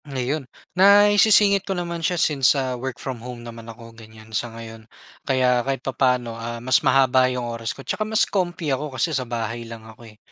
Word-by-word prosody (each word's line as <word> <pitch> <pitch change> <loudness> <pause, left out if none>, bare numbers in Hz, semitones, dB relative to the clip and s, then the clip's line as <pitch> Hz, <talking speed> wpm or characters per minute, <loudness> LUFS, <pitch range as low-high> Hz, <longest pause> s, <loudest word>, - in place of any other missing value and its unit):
Ngayon, 135 0 -3 0.2
naisisingit 205 +1 +5
ko 195 -1 -4
naman 170 -1 -4
siya, 175 +2 0
since 140 -5 +3
sa 130 -1 -1
work 125 0 -5
from 130 -3 -6
home 120 -1 -9
naman 115 -1 -10
ako, 115 0 -12
ganiyan, 110 -1 -15
sa 120 +3 -2
ngayon. 115 0 -11 0.3
Kaya 125 -2 +1
kahit 135 +1 -4
papa'no, 125 -3 0
ah, 115 +1 -6
mas 125 +2 +2
mahaba 130 -1 +3
yung 125 -1 -3
oras 115 -1 -5
ko 135 - -11
tsaka - - -3
mas 215 +1 +2
comfy 175 -6 -2
ako 135 0 -4
kasi 165 - 0
sa 130 -4 -2
bahay 115 0 -4
lang 115 -1 -10
ako, 115 +1 -14
eh. 105 - -19
130 Hz, 200 wpm, -22 LUFS, 115-150 Hz, 0.3 s, naisisingit